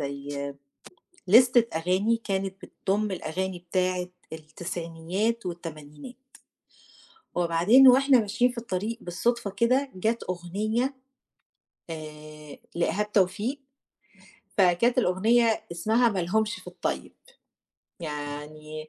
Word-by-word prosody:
زي 140 Hz, 0 st, -5 dB, 0.7 s
لِستة 240 Hz, +2 st, +6 dB
أغاني 185 Hz, +7 st, +1 dB
كانت 195 Hz, -1 st, -2 dB
بتضم 205 Hz, +2 st, -2 dB
الأغاني 185 Hz, +1 st, -3 dB
بتاعة 185 Hz, -1 st, 0 dB, 0.2 s
التسعينيات 170 Hz, +7 st, -3 dB
والتمانينات، 160 Hz, -, -8 dB, 1.2 s
وبعدين 180 Hz, +10 st, +6 dB
وإحنا 270 Hz, +1 st, +6 dB
ماشيين 225 Hz, +4 st, +1 dB
في 245 Hz, -, -10 dB
الطريق 225 Hz, +1 st, -3 dB
بالصدفة 220 Hz, +5 st, -1 dB
كده، 255 Hz, +7 st, +1 dB
جَت 220 Hz, +5 st, -1 dB
أغنية 215 Hz, +9 st, -1 dB, 1.0 s
آآ 155 Hz, -1 st, -9 dB, 0.2 s
لإيهاب 210 Hz, +4 st, 0 dB
توفيق 205 Hz, +7 st, +1 dB, 1.0 s
فكانت 200 Hz, +7 st, +3 dB
الأغنية 225 Hz, +3 st, +3 dB
اسمها 220 Hz, +8 st, +2 dB
ما 200 Hz, -4 st, -2 dB
لهمش 210 Hz, +5 st, 0 dB
في -, -, -13 dB
الطيّب، -, -, -4 dB, 0.9 s
يعني 155 Hz, 0 st, -6 dB
190 Hz, 90 wpm, -27 LUFS, 165-230 Hz, 1.2 s, لِستة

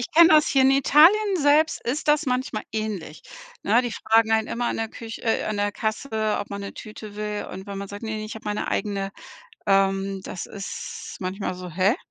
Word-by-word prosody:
ich 245 Hz, -, -2 dB
kenne 335 Hz, +1 st, +8 dB
das 305 Hz, -1 st, +6 dB
hier 270 Hz, -1 st, +3 dB
in 265 Hz, -, +6 dB
Italien 345 Hz, +9 st, +5 dB
selbst 300 Hz, +2 st, +3 dB
ist 290 Hz, +5 st, -2 dB
das 300 Hz, +1 st, +4 dB
manchmal 250 Hz, -4 st, -1 dB
ähnlich, 210 Hz, -8 st, -4 dB, 0.4 s
ne? 235 Hz, +4 st, +3 dB
Die 240 Hz, -2 st, -3 dB
fragen 225 Hz, +1 st, +2 dB
einen 220 Hz, 0 st, +2 dB
immer 240 Hz, +1 st, -2 dB
an -, -, -1 dB
der 225 Hz, 0 st, -2 dB
Küch 225 Hz, +1 st, -8 dB
äh, 225 Hz, -, +1 dB
an 215 Hz, -, -2 dB
der 205 Hz, 0 st, 0 dB
Kasse, 220 Hz, 0 st, -1 dB
ob 205 Hz, -, -6 dB
man 200 Hz, 0 st, -5 dB
'ne 200 Hz, -, -6 dB
Tüte 215 Hz, -1 st, -9 dB
will 210 Hz, 0 st, -3 dB
und 190 Hz, +2 st, -8 dB
wenn 200 Hz, -, -6 dB
man 200 Hz, -, -5 dB
sagt: 205 Hz, +2 st, -8 dB
„Ne, 220 Hz, -1 st, -4 dB
ich 215 Hz, -, -7 dB
habe 220 Hz, -, -10 dB
meine 210 Hz, 0 st, -2 dB
eigene“, 200 Hz, -2 st, -2 dB, 0.6 s
ähm, 195 Hz, -1 st, +2 dB
das 180 Hz, -, -6 dB
ist 200 Hz, -2 st, -7 dB
manchmal 185 Hz, 0 st, -3 dB
so: 180 Hz, 0 st, -8 dB
„Hä?“ 190 Hz, +7 st, +2 dB
215 Hz, 215 wpm, -24 LUFS, 200-250 Hz, 0.6 s, kenne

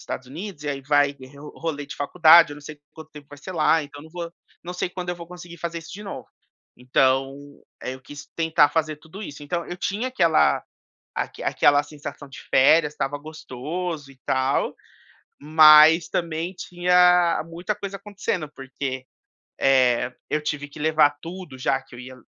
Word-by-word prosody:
Estados 130 Hz, -, -6 dB
Unidos 155 Hz, +3 st, -8 dB
e -, -, -3 dB
aí 140 Hz, -1 st, -3 dB
vai 145 Hz, 0 st, +3 dB
re 130 Hz, 0 st, -15 dB, 0.2 s
rolê 145 Hz, -3 st, -4 dB
de -, -, -8 dB
faculdade, 165 Hz, +2 st, +6 dB
eu 145 Hz, -, -8 dB
não -, -, -12 dB
sei 150 Hz, 0 st, -11 dB
quanto 160 Hz, -1 st, -12 dB
tempo 145 Hz, -1 st, -13 dB
vai 145 Hz, -, -12 dB
ser 185 Hz, -, -8 dB
lá, 160 Hz, -1 st, +3 dB
então 145 Hz, 0 st, -11 dB
não 160 Hz, -, -14 dB
vou 170 Hz, 0 st, -6 dB, 0.3 s
não 175 Hz, -, -6 dB
sei 180 Hz, -, -2 dB
quando 180 Hz, -1 st, -6 dB
eu 175 Hz, -, -4 dB
vou 170 Hz, -1 st, -10 dB
conseguir 175 Hz, 0 st, -11 dB
fazer 170 Hz, 0 st, -4 dB
isso 165 Hz, -, -11 dB
de 205 Hz, -, -8 dB
novo". 200 Hz, -, -8 dB, 0.5 s
Então 135 Hz, +2 st, +1 dB, 0.4 s
aí, -, -, -4 dB
eu 130 Hz, -, -10 dB
quis 145 Hz, +2 st, -11 dB
tentar 160 Hz, -3 st, +3 dB
fazer 155 Hz, -2 st, -1 dB
tudo 160 Hz, +7 st, -11 dB
isso. 145 Hz, -6 st, -9 dB
Então 170 Hz, +3 st, -3 dB
eu 175 Hz, -, -6 dB
tinha 200 Hz, +7 st, -2 dB
aquela 170 Hz, -11 st, +3 dB, 0.5 s
aque -, -, -4 dB
aquela 145 Hz, 0 st, +3 dB
sensação 145 Hz, -1 st, -9 dB
de 135 Hz, -, -11 dB
férias, 150 Hz, +3 st, +5 dB
estava 145 Hz, 0 st, -3 dB
gostoso 155 Hz, +1 st, -6 dB
e 135 Hz, -, -24 dB
tal, 130 Hz, +1 st, 0 dB, 0.7 s
mas 155 Hz, +2 st, +7 dB
também 170 Hz, +2 st, -3 dB
tinha 180 Hz, -1 st, +3 dB
muita 175 Hz, +5 st, -4 dB
coisa 200 Hz, -1 st, -6 dB
acontecendo, 195 Hz, -6 st, -4 dB
porque, 135 Hz, -1 st, -5 dB, 0.6 s
eh, 125 Hz, -2 st, +3 dB, 0.2 s
eu 150 Hz, -, -1 dB
tive 150 Hz, -1 st, -3 dB
que 145 Hz, -, -12 dB
levar 155 Hz, -1 st, +3 dB
tudo 170 Hz, -5 st, -8 dB
já 135 Hz, +1 st, 0 dB
que 135 Hz, -, -18 dB
eu 120 Hz, -, -9 dB
ia 130 Hz, +1 st, -10 dB
155 Hz, 185 wpm, -23 LUFS, 140-175 Hz, 0.7 s, mas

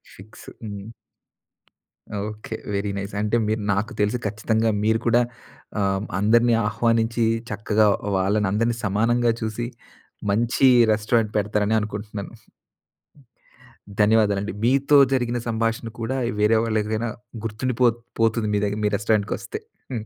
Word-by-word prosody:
Fix. 105 Hz, +3 st, -14 dB, 0.2 s
హ్మ్. 100 Hz, -1 st, -6 dB, 1.5 s
Okay. 110 Hz, +1 st, -7 dB, 0.2 s
Very 100 Hz, 0 st, -1 dB
nice. 100 Hz, +1 st, -5 dB
అంటే 105 Hz, +2 st, 0 dB
మీరు 110 Hz, +1 st, -1 dB
నాకు 100 Hz, +3 st, -2 dB
తెలిసి 105 Hz, +4 st, +1 dB
ఖచ్చితంగా 110 Hz, +2 st, 0 dB
మీరు 110 Hz, +1 st, +2 dB
కూడా 120 Hz, +1 st, +4 dB, 0.6 s
ఆహ్, 95 Hz, +1 st, 0 dB, 0.2 s
అందరిని 115 Hz, +3 st, +4 dB
ఆహ్వానించి, 115 Hz, +1 st, +1 dB, 0.3 s
చక్కగా 105 Hz, +1 st, +2 dB, 0.3 s
వాళ్ళని 100 Hz, +2 st, +1 dB
అందరినీ 115 Hz, +3 st, +1 dB
సమానంగా 115 Hz, +4 st, +2 dB
చూసి, 110 Hz, +2 st, -3 dB, 0.6 s
మంచి 120 Hz, +5 st, +3 dB, 0.3 s
రెస్టారెంట్ 110 Hz, 0 st, +1 dB
పెడతారని 105 Hz, +1 st, +1 dB
అనుకుంటున్నాను. 105 Hz, -1 st, -6 dB, 1.7 s
ధన్యవాదాలండి. 105 Hz, -1 st, +3 dB
మీతో 135 Hz, +4 st, +4 dB, 0.2 s
జరిగిన 120 Hz, -2 st, 0 dB
సంభాషణ 115 Hz, 0 st, -1 dB
కూడా 120 Hz, +4 st, -2 dB, 0.2 s
వేరే 105 Hz, +2 st, +4 dB
వాళ్ళడిగినా 110 Hz, +1 st, -1 dB, 0.4 s
గుర్తుండిపో 120 Hz, +3 st, +1 dB, 0.3 s
పోతుంది. 115 Hz, -1 st, +2 dB
మీ 105 Hz, -, +2 dB
దగ్గర 105 Hz, +1 st, -2 dB
మీ -, -, +3 dB
రెస్టారెంట్ 105 Hz, 0 st, +1 dB
కొస్తే. 430 Hz, -, -6 dB, 0.3 s
హ్మ్. 110 Hz, -2 st, -4 dB
110 Hz, 115 wpm, -23 LUFS, 105-115 Hz, 1.7 s, కూడా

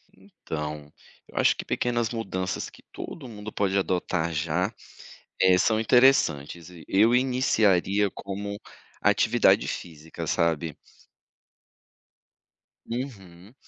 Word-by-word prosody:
Então, 75 Hz, -1 st, -7 dB, 0.4 s
eu -, -, -14 dB
acho -, -, +4 dB
que -, -, -6 dB
pequenas 120 Hz, -2 st, 0 dB
mudanças 95 Hz, -5 st, -3 dB
que -, -, -18 dB
todo 145 Hz, -6 st, -8 dB
mundo 110 Hz, -2 st, -8 dB
pode 100 Hz, -1 st, 0 dB
adotar 90 Hz, -3 st, 0 dB
já, 85 Hz, +7 st, -1 dB, 0.7 s
eh, 95 Hz, -1 st, +6 dB
são 110 Hz, +3 st, +2 dB
interessantes 105 Hz, -, +3 dB
e 85 Hz, -3 st, -13 dB
eu 110 Hz, +5 st, +4 dB
iniciaria 105 Hz, -6 st, +2 dB
como 100 Hz, +2 st, -6 dB, 0.4 s
atividade -, -, +4 dB
física, 80 Hz, -1 st, -7 dB
sabe? 80 Hz, -2 st, 0 dB, 2.1 s
Uhum, 105 Hz, -6 st, -7 dB
95 Hz, 100 wpm, -26 LUFS, 85-115 Hz, 2.1 s, eh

